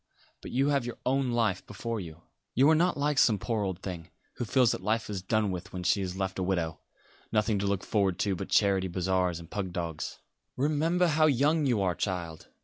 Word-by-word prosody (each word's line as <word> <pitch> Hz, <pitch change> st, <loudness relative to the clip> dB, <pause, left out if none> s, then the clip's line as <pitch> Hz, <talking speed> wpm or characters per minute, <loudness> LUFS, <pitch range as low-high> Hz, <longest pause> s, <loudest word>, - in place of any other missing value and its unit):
But -, -, -8 dB
you 135 Hz, +3 st, +1 dB
have 140 Hz, -3 st, +2 dB
your 120 Hz, -1 st, -6 dB
own 135 Hz, 0 st, +1 dB
life 110 Hz, -6 st, +1 dB
before 115 Hz, +2 st, -4 dB
you. 85 Hz, -3 st, -9 dB, 0.3 s
You 135 Hz, +4 st, +5 dB
are -, -, +5 dB
not 175 Hz, +1 st, +2 dB
like 145 Hz, 0 st, +1 dB
some 110 Hz, -4 st, +5 dB
poor 110 Hz, +3 st, -2 dB
old 95 Hz, -3 st, -4 dB
thing, 85 Hz, -4 st, -6 dB, 0.3 s
who 120 Hz, -, -2 dB
feels 125 Hz, 0 st, +3 dB
that -, -, -3 dB
life 110 Hz, +2 st, -1 dB
is 95 Hz, -3 st, -3 dB
done 105 Hz, +1 st, +1 dB
with 90 Hz, -1 st, -6 dB
when 90 Hz, -1 st, -5 dB
she 100 Hz, +3 st, +2 dB
is 90 Hz, -1 st, -3 dB
left 95 Hz, 0 st, -3 dB
a -, -, 0 dB
widow; 85 Hz, -4 st, -1 dB, 0.5 s
nothing 105 Hz, -1 st, +1 dB
to 100 Hz, -, -1 dB
look 100 Hz, -1 st, 0 dB
forward 100 Hz, -4 st, +1 dB
to 100 Hz, -2 st, +1 dB
but -, -, -6 dB
charity 95 Hz, -2 st, +3 dB
bazaars 90 Hz, -1 st, 0 dB
and 85 Hz, 0 st, -12 dB
pug 95 Hz, -3 st, -3 dB
dogs. 85 Hz, -3 st, -4 dB, 0.4 s
Remember 155 Hz, +6 st, +2 dB
how 155 Hz, -1 st, +4 dB
young 145 Hz, +2 st, +2 dB
you 115 Hz, -6 st, +2 dB
are, 90 Hz, -2 st, +1 dB
child! 85 Hz, -4 st, -4 dB
100 Hz, 220 wpm, -29 LUFS, 90-125 Hz, 0.5 s, You